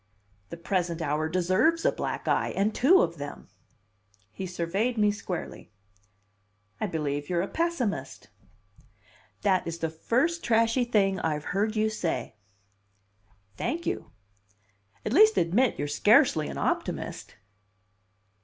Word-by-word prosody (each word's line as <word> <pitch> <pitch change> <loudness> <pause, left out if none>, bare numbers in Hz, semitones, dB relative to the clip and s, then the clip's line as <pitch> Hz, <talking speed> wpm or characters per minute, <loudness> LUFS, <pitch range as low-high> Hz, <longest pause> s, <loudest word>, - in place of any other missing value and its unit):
"The - - -7
present 170 -1 -1
hour 155 0 -1
deserves 185 - +2
a - - +5
black - - -4
eye, - - +1
and 205 +2 +1
two 325 +10 +5
of 170 0 -3
them!" 145 0 -8 0.8
He 190 - -6
surveyed 190 +7 -1
me 210 -1 +3
squarely. 185 -4 -6 1.1
"I 215 - -1
believe 145 -4 -3
you're 175 -1 +1
a - - -3
pessimist!" 330 -10 -2 1.2
"That 190 -4 +2
is 165 0 -4
the 160 -1 -3
first 260 - 0
trashy 230 +2 +2
thing 195 -5 +2
I've 150 -3 -2
heard 210 +3 0
you 215 0 +2
say." 170 - -3 1.2
"Thank 340 +2 -3
you! - - -3 1.0
At 215 - -1
least 435 +7 +6
admit 210 +9 +2
you're 145 - -2
scarcely 205 - +4
an - - -6
optimist." - - -3
195 Hz, 125 wpm, -27 LUFS, 165-230 Hz, 1.2 s, least